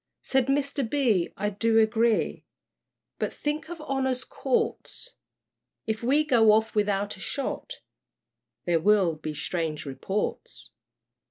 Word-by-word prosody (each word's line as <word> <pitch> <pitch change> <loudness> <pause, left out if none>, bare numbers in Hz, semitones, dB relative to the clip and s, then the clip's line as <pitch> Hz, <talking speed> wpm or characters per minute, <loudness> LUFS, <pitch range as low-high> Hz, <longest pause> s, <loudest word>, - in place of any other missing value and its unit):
Said 265 -1 +2
Mr, 275 -2 0
B., 230 -11 +2
I 205 +1 -1
do 225 +3 +1
agree 225 0 +2 0.8
But - - -1
think 300 +2 -3
of 345 -1 -7
Honor's 265 -3 -1
Courts! 480 +1 -1 0.7
If 220 0 -2
we 275 +6 +3
go 230 -6 +5
off 220 +1 +2
without 205 -1 0
a - - -13
shot, 395 - -4 0.8
There 170 -2 +2
will 195 -1 +3
be 155 0 -6
strange 160 -1 -3
reports. 190 +9 -4
225 Hz, 120 wpm, -27 LUFS, 195-275 Hz, 0.8 s, go